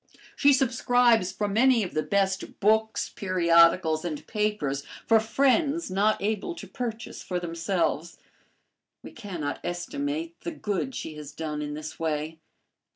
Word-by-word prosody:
She 285 - +5
subscribes 245 -5 +3
for 210 - -2
many 230 +3 +4
of 185 - -5
the 155 - +1
best 195 +1 -1
books, 220 +2 +2
periodicals, 170 -3 +3
and 155 -4 -5
papers 210 -11 -1 0.2
for 225 -1 +5
friends 275 - +1
not 205 +3 +2
able 220 - -1
to - - -8
purchase 230 -3 -6
for 180 -1 -3
themselves. 170 -1 -2 0.9
We - - -9
cannot 175 - -5
estimate 290 - -4
the 340 - -5
good 215 -1 -3
she 155 - -5
has 150 -1 -8
done 150 -1 -4
in 150 0 -4
this 155 +1 -7
way. 160 0 -2
200 Hz, 140 wpm, -27 LUFS, 165-235 Hz, 0.9 s, She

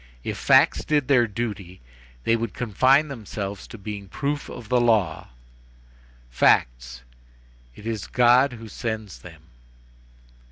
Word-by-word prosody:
If - - -4
facts - - +4
did 150 -3 0
their 125 -4 +4
duty, 100 -4 -5 0.4
they 115 - +2
would 115 -3 -4
confine 130 +6 +3
themselves 105 -6 -6
to - - -10
being 100 -1 -7
proofs 140 +8 -3
of 120 -3 -9
the 125 0 +2
law; 105 -9 +1 1.0
facts—it - - +1 0.8
is 110 -4 -4
God 125 +2 +4
who 115 -1 -10
sends 110 - -5
them. - - -14
115 Hz, 120 wpm, -24 LUFS, 100-125 Hz, 1.0 s, facts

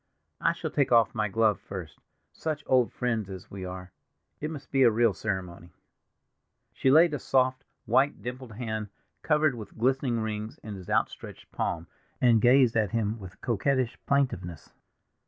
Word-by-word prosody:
"I - - +2
shall - - -5
take 140 -3 +1
off 115 -3 +5
my 105 0 0
glove 110 +1 +2
first—such 100 - -7
old 125 -2 +3
friends 115 -5 -2
as 95 -2 -9
we 95 -1 -6
are! 90 0 -7 0.5
It 150 - -3
must 150 -3 -9
be 135 - +2
a 125 - +8
real 115 -1 +3
ceremony." 90 -5 -5 1.0
She 135 - +1
laid 160 +3 +6
a 145 - -2
soft, 130 0 +1 0.2
white, 130 +5 +2
dimpled 125 -1 -6
hand, 110 -2 -4 0.3
covered 150 -2 +2
with 110 -4 -10
glistening 125 0 +1
rings, 110 0 -4
in 105 - -6
his 95 -3 -9
outstretched - - -2
palm, 85 0 -2 0.3
and 115 -3 +4
gazed 125 -1 +5
at 110 -3 +2
him 115 -1 -1
with 95 -1 -11
coquettish 125 +2 0
plaintiveness. 95 - -1
115 Hz, 155 wpm, -28 LUFS, 100-130 Hz, 1.0 s, a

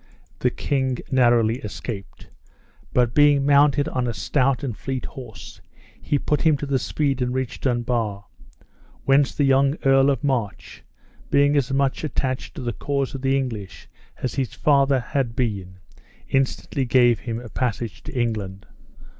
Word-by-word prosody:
The - - +2
king 130 -3 -1
narrowly 120 -2 +3
escaped; 105 -2 -8 0.6
but 120 -1 +2
being 145 -2 +4
mounted 145 +1 +4
on 125 -1 -1
a 115 - -3
stout 135 +6 +1
and 125 -6 -3
fleet 130 +2 -4
horse, 125 -5 -10 0.4
he 145 - 0
put 150 +1 -1
him 155 -3 +3
to 145 - -4
the 140 -2 0
speed 140 -3 -1
and 125 0 -1
reached 130 -2 -3
Dunbar, 120 -5 -1 0.8
whence 135 0 +3
the 145 - +1
young 135 +1 +3
Earl 135 0 +5
of 135 -4 -1
March, 125 -8 -2 0.5
being 145 +1 +3
as 135 -3 +1
much 135 +1 0
attached 130 -4 -3
to - - -6
the 120 -1 -2
cause 140 +1 -2
of 135 -1 -3
England 125 -8 -1 0.5
as 130 - -1
his 135 -3 -3
father 140 -2 +3
had 125 -2 -2
been, 100 -7 -3 0.5
instantly 135 +1 -1
gave 120 -2 +4
him 115 -1 -4
a 120 - -9
passage 115 -5 -3
to 125 - -5
England. 105 -5 -3
130 Hz, 155 wpm, -23 LUFS, 120-140 Hz, 0.8 s, Earl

